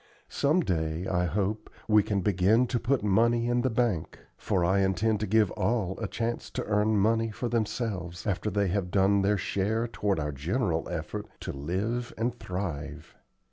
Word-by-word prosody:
Some 150 +6 +2
day, 80 - -1
I 90 -1 +1
hope, 105 +4 -2 0.2
we 105 -1 +6
can 100 -1 -1
begin 100 +5 +3
to 120 - 0
put 125 0 0
money 115 +4 +3
in 120 0 +2
the 130 - +1
bank; 115 -8 -1 0.2
for 90 -2 0
I 95 +3 +3
intend 100 +3 +1
to 105 - -2
give 105 0 +3
all 105 -6 0
a 115 - -2
chance 115 +3 -3
to - - -1
earn 105 +1 +2
money 115 +3 +2
for 115 +3 -4
themselves, 105 -6 -2
after 100 +1 -1
they 100 -1 +1
have 95 -1 -1
done 100 +1 +3
their 100 +1 +2
share 110 +5 -1
toward 105 -5 -1
our 75 -1 -2
general 80 - -1
effort 90 +5 -4
to - - -4
live 100 - -3
and 115 +2 0
thrive. 80 -4 -5
105 Hz, 180 wpm, -28 LUFS, 90-115 Hz, 0.2 s, we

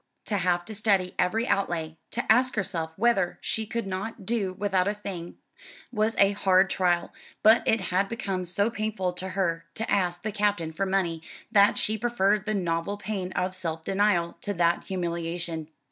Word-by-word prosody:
To 205 - 0
have 175 -1 +1
to 220 - -7
study 200 -4 +1
every 225 +6 +1
outlay, 165 -5 0
to 240 - -3
ask 250 +2 +4
herself 170 -6 -2
whether 200 -4 +2
she 220 -1 -2
could 230 0 -3
not 195 +2 -5
do 210 -4 0
without 190 -1 +1
a 205 - 0
thing, 185 -5 -7 0.5
was 220 -1 +1
a 200 0 +5
hard 190 -2 +3
trial; 175 -2 +1 0.3
but 220 +2 +7
it 225 - +4
had 190 +1 0
become 195 -5 -3
so 200 +6 0
painful 215 -5 -2
to 185 +1 -5
her 165 -3 0
to 225 - -3
ask 175 -3 +1
the 215 - -2
Captain 205 -6 0
for 195 +4 -1
money 180 -4 0 0.3
that 205 -2 +5
she 215 0 0
preferred 210 -3 +1
the 215 - +1
novel 175 +1 -1
pain 195 -3 -4
of 185 +1 -1
self 165 -3 -4
denial 190 -3 +1
to 205 - -3
that 170 0 +2
humiliation. 170 -3 -3
195 Hz, 175 wpm, -27 LUFS, 175-210 Hz, 0.5 s, but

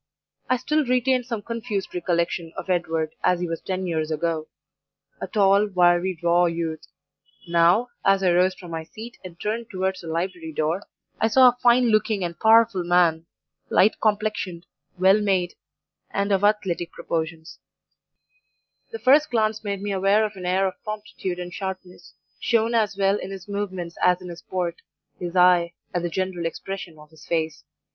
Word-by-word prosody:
"I 255 - +3
still 305 +5 0
retained 255 -1 +1
some 230 -4 -4
confused 230 -4 -4
recollection 170 -2 -1
of 190 - -3
Edward 165 -3 -1
as 180 - +3
he 175 - -2
was 165 0 -4
ten 185 0 -3
years 160 -3 -1
ago 160 0 -2 0.7
a - - -3
tall, 200 0 +3
wiry, 180 -1 +2
raw 175 +1 +4
youth; 165 -2 -3 0.6
NOW, 175 +8 +3
as 195 0 +3
I 180 - +4
rose 185 +1 +3
from 175 -3 -11
my 165 -1 -3
seat 225 +8 -11
and 175 -2 -11
turned 225 +2 -3
towards 190 0 -2
the 170 - -10
library 165 0 -3
door, 155 +5 -1 0.4
I 225 - +3
saw 255 +3 +7
a 245 - -4
fine 245 0 +5
looking 215 -2 +1
and 170 -1 -5
powerful 220 -4 +5
man, 170 -2 +2 0.4
light 210 - +3
complexioned, 210 -5 -1 0.3
well 190 +3 +5
made, 185 -4 +1 0.6
and 200 +1 -1
of 195 0 +2
athletic 195 -5 +1
proportions; 160 0 -4 1.3
the 455 - -6
first 295 -5 +4
glance 220 -2 0
made 200 -1 -3
me 205 - -2
aware 195 +3 +3
of 210 -1 -6
an 180 -1 -6
air 190 +2 +2
of 190 - -4
promptitude 210 -4 -5
and 180 0 -6
sharpness, 190 -2 -7 0.2
shown 230 0 +1
as 215 -3 +1
well 195 0 +2
in - - -6
his 195 -1 -8
movements 190 -4 -4
as 180 0 +4
in 180 -1 -9
his 170 0 -9
port, 175 -2 -3 0.4
his 175 0 -5
eye, 180 -1 +4 0.2
and 175 -1 -1
the 175 - -1
general 180 -1 -2
expression 175 -1 -7
of 150 0 -16
his 160 - -16
face. 160 -3 -2
185 Hz, 170 wpm, -24 LUFS, 170-210 Hz, 1.3 s, saw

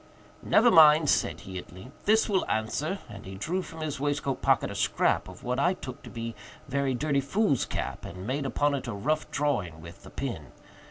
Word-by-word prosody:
"Never 235 +2 +5
mind," 155 -1 +7
said - - 0
he 95 -1 -6
at 85 - -12
length, 125 - -13
"this 220 +2 +4
will 195 -3 +2
answer;" 140 - -1
and 100 - -10
he 95 0 -8
drew 170 - -2
from 160 -3 -9
his 150 -4 -3
waistcoat 145 -1 -1
pocket - - +2
a - - -5
scrap - - +1
of 90 -1 -12
what 125 +1 -1
I 180 +2 +3
took 130 -8 -8
to - - -10
be 115 -1 -5 0.3
very 140 -1 0
dirty 140 +1 +1
foolscap, 165 - -1
and 90 +2 -8
made 135 +4 -1
upon 145 +2 +1
it 135 -3 -3
a 115 - -3
rough 150 +10 -1
drawing 120 - -1
with 85 +1 -11
the - - -12
pen. - - -5
140 Hz, 205 wpm, -28 LUFS, 110-155 Hz, 0.3 s, mind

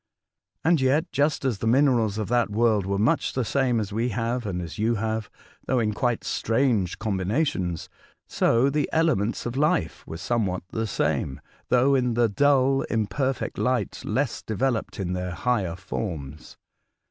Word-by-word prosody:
And 160 -3 +3
yet, 140 +6 +2
just 140 +2 +1
as 120 -7 0
the 115 - -2
minerals 120 -4 +3
of 110 -3 -2
that 120 -2 +2
world 105 -2 +2
were 100 0 0
much 105 +4 +1
the 130 -2 -1
same 130 -2 +1
as 105 -2 -4
we 115 +3 0
have 115 +1 -2
and 90 -3 -2
as 85 0 -7
you 115 +2 +2
have, 110 -1 -2 0.4
though 130 - +1
in 110 -3 +1
quite 120 +2 0
strange 115 -6 0
combina 105 - 0
tions, 90 - -3 0.4
so 125 +4 +2
the 145 0 0
elements 155 -10 +1
of 120 +1 -3
life 140 - 0
were 80 - -6
somewhat 95 -2 -1
the 110 0 -2
same, 70 -7 -1 0.3
though 130 +3 +4
in 125 -3 +1
the 120 0 +4
dull, 135 +3 +3
imperfect 125 +5 -1
light, 125 -5 0
less 125 +3 -1
developed 115 0 -2
in 90 -2 -2
their 90 -1 -3
4iigher 95 -4 -1
forms. 80 -7 -6
115 Hz, 165 wpm, -25 LUFS, 100-130 Hz, 0.4 s, though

